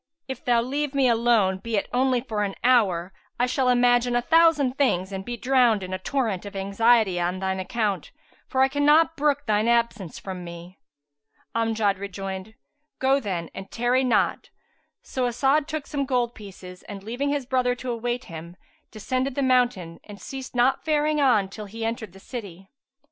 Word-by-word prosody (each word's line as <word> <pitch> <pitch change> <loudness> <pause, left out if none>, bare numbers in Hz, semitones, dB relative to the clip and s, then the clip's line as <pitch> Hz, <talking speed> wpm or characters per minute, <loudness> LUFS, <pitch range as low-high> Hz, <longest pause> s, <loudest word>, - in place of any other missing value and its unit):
If 265 - -6
thou 240 -1 +3
leave 285 +3 -2
me 270 -2 +4
alone, 225 -5 +2
be 225 +2 -2
it 200 - -1
only 255 0 +2
for 220 -4 -3
an 200 -1 -2
hour, 195 -8 +3 0.3
I 245 - +4
shall 255 0 +1
imagine 245 0 +3
a 240 - +2
thousand 320 -4 +4
things 195 -10 +1
and 190 -1 -5
be 240 +3 -5
drowned 245 -5 +3
in 185 0 -6
a 185 - -3
torrent 220 -4 -1
of 205 -1 -9
anxiety 200 0 +2
on 175 +2 -1
shine 190 0 -2
account, 200 +1 -2 0.4
for 260 - 0
I - - +5
cannot 295 +4 +3
brook 290 -1 +1
shine 215 +1 +2
absence 235 -7 0
from 185 -2 -7
me." 170 +2 -10 0.7
Amjad 225 -4 0
rejoined, 195 +1 -6 0.4
"Go 270 +1 +3
then 185 -8 -4
and 195 0 -8
tarry 245 +2 +1
not. 250 - +1 0.5
So 255 -1 -2
As'ad 275 +5 +1
took 310 -3 -4
some 280 -2 -3
gold 245 -2 0
pieces, 185 -3 -11
and 200 -2 -8
leaving 245 +7 -2
his 285 -2 -1
brother 250 -1 +1
to 250 0 -5
await 240 +1 -2
him, 170 +1 -10 0.3
descended 255 +5 -2
the 280 - 0
mountain 245 -10 +1
and 205 -1 -11
ceased 265 +5 -8
not 245 +2 +2
faring 300 -1 +1
on 235 -8 +3
till 210 +2 -8
he 225 +3 -6
entered 225 -4 -4
the 195 - -14
city. 195 -5 -9
235 Hz, 180 wpm, -25 LUFS, 195-260 Hz, 0.7 s, I